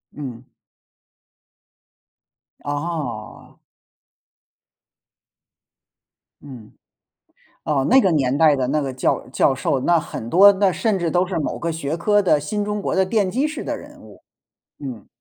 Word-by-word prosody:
嗯。 130 -5 -7 2.2
哦。 145 -7 -5 2.8
嗯， 125 -7 -12 0.9
哦， 140 -3 0
那 265 +2 +7
个 190 -6 +2
年 135 -4 +1
代 155 -2 +5
的 130 -2 -1
那 150 +3 0
个 135 -2 -4
教 130 - -1
教 135 +1 +2
授， 135 +1 -1
那 170 +4 +3
很 115 -6 -7
多 195 +7 +7
那 195 -1 +2
甚 215 +2 0
至 170 - -1
都 180 +2 +1
是 185 -2 -4
某 150 - -3
个 170 - -3
学 160 -1 -3
科 205 +4 +2
的 175 -6 +3
新 205 +8 -3
中 210 0 -3
国 - - -2
的 190 0 +3
奠 200 0 0
基 260 +10 0
式 310 - -6
的 - - -3
人 - - -14
物， - - -16 0.6
嗯。 125 -7 -8
160 Hz, 150 characters per minute, -21 LUFS, 135-190 Hz, 2.8 s, 那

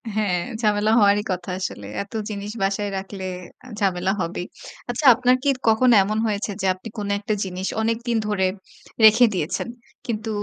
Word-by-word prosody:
হ্যাঁ, 200 -5 +1 0.2
ঝামেলা 210 -1 +2
হওয়ারই 205 0 +4
কথা 180 0 -4
আসলে। 105 - -5 0.2
এত 200 - -18 0.2
জিনিস 205 0 -5
বাসায় 200 +1 0
রাখলে 190 0 -7
এ 215 +6 -13
ঝামেলা 190 -2 +1
হবেই। 175 +1 -3 0.4
আচ্ছা, 250 +5 -2
আপনার 250 +1 +3
কি 285 - +2 0.2
কখনো 235 +3 +5
এমন 215 +2 -2
হয়েছে 205 0 -2
যে, 195 - -1
আপনি 185 +5 -10
কোনো 205 -1 -3
একটা 210 +1 -2
জিনিস 185 0 -4
অনেকদিন 230 +1 0
ধরে 200 -3 +1 0.6
রেখে 220 +3 +7
দিয়েছেন 175 +4 -2 0.4
কিন্তু, 220 -1 -3
205 Hz, 160 wpm, -23 LUFS, 190-220 Hz, 0.6 s, রেখে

